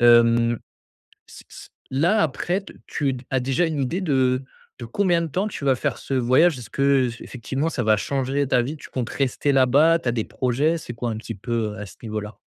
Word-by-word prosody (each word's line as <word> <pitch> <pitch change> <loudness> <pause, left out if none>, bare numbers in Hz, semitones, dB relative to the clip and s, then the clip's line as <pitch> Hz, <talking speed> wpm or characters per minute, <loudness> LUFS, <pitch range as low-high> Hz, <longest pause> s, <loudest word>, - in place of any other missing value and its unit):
Hem 120 0 +5 0.7
c - - -13
c - - -12 0.2
là, 170 +11 +3
après, 175 +6 -1
t - - -13
tu 135 -3 -1
as 130 -1 +1
déjà 135 +7 +1
une 155 -3 -2
idée 165 +9 -1
de 130 -6 +1 0.4
de - - -5
combien 175 - +1
de 165 - -3
temps 190 +7 -1
tu 150 - -6
vas 135 -2 +3
faire - - -2
ce 135 - -4
voyage? 130 +5 +4
Est-ce 120 - -10
que 140 -2 +3
j 115 0 -8
heu - - -9
effectivement 135 +5 -3
ça 130 -6 -2
va 110 -1 +4
changer 135 +4 -1
ta 120 - +3
vie. 145 +6 -4
Tu - - -12
comptes 125 -3 -3
rester 140 +1 0
là-bas? 140 +6 +5
Tu 125 - -3
as - - +2
des 115 -3 -1
projets? 140 +7 0
C'est 120 - -8
quoi 120 0 -3
un 110 - -3
petit 115 0 -6
peu, 110 +1 -2
heu, - - -10
à 105 - -5
ce 90 - -14
niveau-là? 105 -1 -5
130 Hz, 230 wpm, -23 LUFS, 120-150 Hz, 0.7 s, Hem